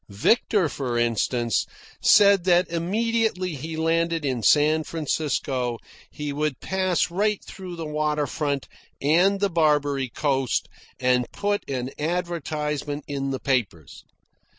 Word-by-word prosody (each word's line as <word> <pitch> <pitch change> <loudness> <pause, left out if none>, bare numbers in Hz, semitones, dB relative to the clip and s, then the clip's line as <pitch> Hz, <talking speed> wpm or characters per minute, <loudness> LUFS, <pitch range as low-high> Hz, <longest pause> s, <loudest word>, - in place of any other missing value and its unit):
Victor, 180 - +2
for 130 -4 -3
instance, 120 -1 0 0.3
said 200 -3 +6
that 180 -1 +4
immediately 195 +1 0
he 160 +3 -6
landed 165 0 0
in 130 -4 -1
San 150 +7 +4
Francisco 135 -6 -2 0.3
he 150 -1 -5
would 150 -1 -2
pass 185 -2 0
right 205 +3 +1
through 185 -2 -8
the 165 -1 -5
water 150 -1 0
front 145 -2 -2 0.3
and 180 +7 +3
the 200 - +2
Barbary 145 -5 +2
Coast, 135 -2 0 0.3
and 125 -1 +1
put 205 0 -1
an 130 -1 -3
advertisement 150 -3 -2
in 140 -1 -3
the 135 -1 -3
papers. 105 - -2
150 Hz, 125 wpm, -24 LUFS, 135-175 Hz, 0.3 s, said